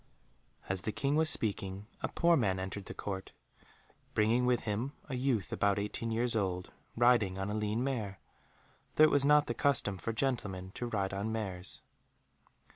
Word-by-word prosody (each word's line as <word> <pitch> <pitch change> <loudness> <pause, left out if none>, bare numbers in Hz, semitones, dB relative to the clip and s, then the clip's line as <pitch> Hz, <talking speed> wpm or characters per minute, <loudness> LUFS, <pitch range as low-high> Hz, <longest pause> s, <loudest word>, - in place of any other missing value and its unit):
As 95 -1 -1
the 110 - -2
King 140 +6 0
was 160 0 +3
speaking, 100 -5 -1 0.2
a - - 0
poor 170 0 +3
man 100 -10 +2
entered 95 +1 -5
the - - -7
Court, 95 -2 -5 0.8
bringing 115 +4 +3
with 125 -1 +3
him 115 +6 -2 0.2
a 130 - -2
youth 125 -6 0
about 100 -1 +2
eighteen 105 +3 -3
years 115 +1 +2
old, 95 -3 -1 0.3
riding 115 -6 +4
on 95 +1 -2
a - - -2
lean 105 +2 0
mare, 110 -8 -2 0.8
though 155 - +6
it 155 - +7
was 140 -1 +3
not 150 0 +6
the 120 - -2
custom 115 -8 +1
for 115 - -2
gentlemen 105 -7 -1
to 120 - -4
ride 100 -4 -1
on 100 +3 -2
mares. 95 -5 -3
110 Hz, 175 wpm, -32 LUFS, 95-125 Hz, 0.8 s, it